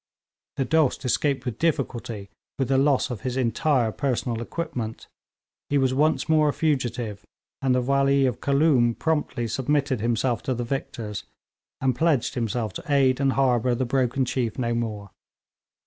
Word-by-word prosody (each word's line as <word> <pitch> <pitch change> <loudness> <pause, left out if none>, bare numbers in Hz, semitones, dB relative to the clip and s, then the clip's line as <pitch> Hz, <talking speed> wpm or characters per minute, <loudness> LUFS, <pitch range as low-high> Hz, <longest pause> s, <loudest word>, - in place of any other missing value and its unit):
The 135 - +1
Dost 155 -3 +1
escaped 135 +1 0
with 120 -3 -4
difficulty, 120 -10 -2 0.3
with 135 -2 -1
the 135 -1 +3
loss 140 -1 +2
of 115 -5 -5
his 130 +1 -3
entire 125 0 +1
personal 120 -3 -2
equipment. 120 -5 -4 0.6
He 145 - +2
was 130 -1 +2
once 150 +4 +2
more 155 -2 +4
a - - 0
fugitive, 120 -8 -1 0.4
and 130 -2 +2
the 125 - +1
Wali 140 +1 +3
of 125 -5 -1
Khooloom 140 -5 +3
promptly 150 -7 -1
submitted 135 +1 0
himself 120 +1 0
to 130 - -2
the 120 - -2
victors, 115 -4 -4 0.6
and 130 -2 +1
pledged 150 -2 +1
himself 115 -3 -2
to - - -7
aid 135 -2 +3
and 135 -1 +2
harbour 125 -2 +2
the 130 +2 -1
broken 130 +1 +1
chief 120 -3 -2
no 120 -2 0
more. 105 -4 -3
130 Hz, 160 wpm, -25 LUFS, 120-140 Hz, 0.6 s, more